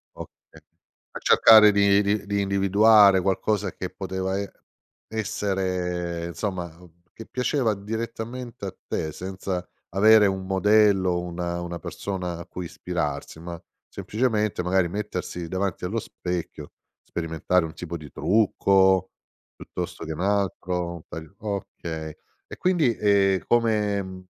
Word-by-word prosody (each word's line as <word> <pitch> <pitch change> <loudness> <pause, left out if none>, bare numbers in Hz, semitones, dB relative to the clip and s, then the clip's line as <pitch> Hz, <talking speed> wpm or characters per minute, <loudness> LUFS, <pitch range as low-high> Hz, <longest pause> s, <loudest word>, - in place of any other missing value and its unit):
Okay, - - -13 0.5
a - - -7
cercare 110 -2 +7
di 100 0 +4
di 100 0 0
di 100 0 0
individuare 100 0 +5
qualcosa 100 +1 0
che 90 - -5
poteva 95 0 -3
e 100 0 -4 0.6
essere 90 -5 -2
insomma 85 -3 -4 0.4
che 115 - -10
piaceva 125 -3 0
direttamente 115 +3 -6
a - - -6
te 80 - -2
senza, 95 0 -5 0.2
avere 105 +2 +6
un 95 -1 -2
modello, 95 -2 +3
una 85 0 -4
una 85 0 -5
persona 90 -3 -4
a - - -8
cui 90 - -7
ispirarsi, 80 -3 -4
ma 85 0 -7 0.3
semplicemente 110 -4 -1
magari 90 0 +2
mettersi 90 -3 -4
davanti 95 0 -2
allo 110 +6 -1
specchio, 90 -4 -5 0.3
sperimentare 80 +1 -1
un 80 - -8
tipo 85 +1 -6
di 75 -3 -12
trucco, 95 -3 +3 0.4
piuttosto - - -6
che 80 - -4
un 80 - -6
altro, 90 -3 -1
un 85 - -10
taglio 80 +4 -9
okay. 85 -6 -5 0.3
E - - -9
quindi, 165 -10 +2
ehm, 95 -3 +3
come 105 -5 0
95 Hz, 125 wpm, -25 LUFS, 90-105 Hz, 0.6 s, cercare